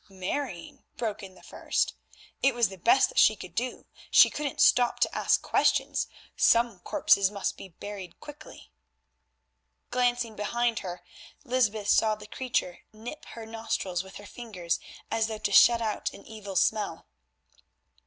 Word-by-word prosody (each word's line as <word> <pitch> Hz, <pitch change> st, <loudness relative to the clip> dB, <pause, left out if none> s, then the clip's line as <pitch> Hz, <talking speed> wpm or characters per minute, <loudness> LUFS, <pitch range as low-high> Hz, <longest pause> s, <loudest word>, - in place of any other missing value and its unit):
"Marrying?" 190 Hz, +1 st, -5 dB
broke 215 Hz, -3 st, -3 dB
in 190 Hz, -2 st, -11 dB
the -, -, -18 dB
first, -, -, -1 dB, 0.5 s
"it 270 Hz, -2 st, +3 dB
was 235 Hz, -4 st, +2 dB
the 195 Hz, -, -9 dB
best 360 Hz, -, +4 dB
that -, -, 0 dB
she -, -, +6 dB
could -, -, -10 dB
do. -, -, -3 dB, 0.2 s
She -, -, +7 dB
couldn't 290 Hz, -2 st, -4 dB
stop 245 Hz, -1 st, +4 dB
to -, -, +2 dB
ask -, -, +2 dB
questions. -, -, +1 dB, 0.3 s
Some 235 Hz, -4 st, +3 dB
corpses 195 Hz, +2 st, +3 dB
must 200 Hz, -1 st, -3 dB
be 195 Hz, -, -11 dB
buried 190 Hz, 0 st, -9 dB
quickly." 295 Hz, -, -12 dB, 1.2 s
Glancing 245 Hz, -2 st, 0 dB
behind 235 Hz, +2 st, 0 dB
her, 180 Hz, -1 st, -7 dB, 0.4 s
Lysbeth 220 Hz, -6 st, 0 dB
saw 220 Hz, -1 st, +4 dB
the 210 Hz, 0 st, -12 dB
creature 235 Hz, -6 st, -2 dB
nip 225 Hz, +7 st, -9 dB
her 230 Hz, -1 st, -8 dB
nostrils 220 Hz, -5 st, -3 dB
with 190 Hz, 0 st, -14 dB
her 205 Hz, -, -10 dB
fingers, 205 Hz, -6 st, -4 dB, 0.3 s
as 225 Hz, 0 st, +1 dB
though 220 Hz, -1 st, -5 dB
to 205 Hz, -, -2 dB
shut 235 Hz, +3 st, +6 dB
out 215 Hz, -1 st, -2 dB
an -, -, -14 dB
evil 205 Hz, -3 st, -9 dB
smell. 200 Hz, -2 st, 0 dB
220 Hz, 155 wpm, -28 LUFS, 195-240 Hz, 1.2 s, She